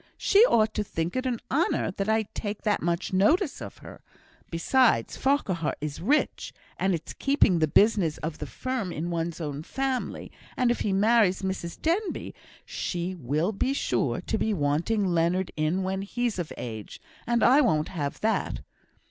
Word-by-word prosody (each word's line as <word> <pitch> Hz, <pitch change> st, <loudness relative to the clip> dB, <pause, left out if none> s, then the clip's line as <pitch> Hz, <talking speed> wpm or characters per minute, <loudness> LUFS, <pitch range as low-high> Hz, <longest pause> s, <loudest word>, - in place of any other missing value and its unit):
She 400 Hz, -, +3 dB
ought 220 Hz, -, +3 dB
to 210 Hz, -, -1 dB
think 165 Hz, -3 st, -3 dB
it 255 Hz, 0 st, -1 dB
an 240 Hz, -3 st, -1 dB
honour 295 Hz, -, +1 dB
that 195 Hz, +2 st, -3 dB
I 220 Hz, 0 st, +3 dB
take 205 Hz, -1 st, -4 dB
that 210 Hz, -1 st, +1 dB
much 170 Hz, +2 st, -1 dB
notice 290 Hz, -, +2 dB
of -, -, -8 dB
her. -, -, -11 dB, 0.5 s
Besides, 240 Hz, +9 st, +2 dB
Farquhar 195 Hz, -, 0 dB
is 150 Hz, +1 st, -5 dB
rich, 280 Hz, -, 0 dB, 0.2 s
and 190 Hz, -1 st, +2 dB
it's 165 Hz, -, -7 dB
keeping 275 Hz, -, +3 dB
the 155 Hz, -, +3 dB
business 195 Hz, -2 st, +3 dB
of 160 Hz, 0 st, -5 dB
the 150 Hz, -, -5 dB
firm 230 Hz, -, -3 dB
in 170 Hz, +2 st, -3 dB
one's 170 Hz, 0 st, -2 dB
own 145 Hz, -3 st, -4 dB
family; 265 Hz, +8 st, -3 dB, 0.3 s
and 250 Hz, -2 st, +3 dB
if 240 Hz, -, -1 dB
he 205 Hz, -, 0 dB
marries 205 Hz, -1 st, +3 dB
Mrs 190 Hz, -3 st, -4 dB
Denbigh 365 Hz, +6 st, -1 dB, 0.3 s
she 175 Hz, +1 st, -3 dB
will 155 Hz, -, -1 dB
be 255 Hz, +6 st, -1 dB
sure -, -, 0 dB
to -, -, -2 dB
be 220 Hz, -1 st, 0 dB
wanting 165 Hz, +8 st, +1 dB
Leonard 175 Hz, +1 st, +1 dB
in 155 Hz, +5 st, 0 dB
when 190 Hz, +1 st, -2 dB
he's 230 Hz, +1 st, -2 dB
of 170 Hz, -, -4 dB
age, 110 Hz, -3 st, -7 dB, 0.3 s
and 235 Hz, 0 st, +2 dB
I 265 Hz, +5 st, +6 dB
won't 155 Hz, -, +1 dB
have 145 Hz, -6 st, -4 dB
that. 220 Hz, +1 st, 0 dB
190 Hz, 175 wpm, -27 LUFS, 165-235 Hz, 0.5 s, I